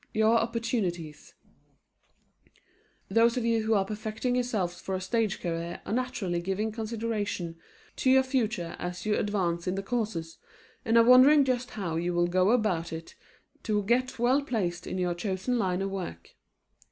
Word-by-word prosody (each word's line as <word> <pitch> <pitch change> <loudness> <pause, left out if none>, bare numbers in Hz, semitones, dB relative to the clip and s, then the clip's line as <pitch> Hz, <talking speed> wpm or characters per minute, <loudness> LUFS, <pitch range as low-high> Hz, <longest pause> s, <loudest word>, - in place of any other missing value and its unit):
YOUR 220 +1 +4
OPPORTUNITIES 220 - -3 1.7
Those 230 +1 +3
of 240 - -1
you 230 -1 +2
who 220 0 +1
are 195 -1 +2
perfecting 215 +4 -3
yourselves 215 -8 -1
for 190 - -3
a - - -2
stage 215 +2 -1
career 170 0 -4
are - - -3
naturally 225 -8 -1
giving 195 +5 -2
consideration 215 -6 -3 0.4
to 260 - +1
your 265 0 +6
future 225 -10 -1
as 175 0 -5
you 210 -1 +2
advance 180 -5 -1
in 180 - 0
the 195 - -3
courses, 195 -8 -3 0.4
and 225 +1 +3
are 230 - +8
wondering 265 +4 +7
just 255 -1 -1
how 170 -5 -2
you 175 +1 -1
will 175 0 +3
go 185 +2 +2
about 210 -8 +1
it 165 0 -7 0.5
to 210 -2 0
get 245 +4 +1
well 250 +4 +3
placed 185 -10 -2
in - - -3
your 180 -1 0
chosen 190 +7 -2
line 190 -2 0
of 195 - -3
work. 130 - -6
210 Hz, 165 wpm, -28 LUFS, 175-235 Hz, 1.7 s, are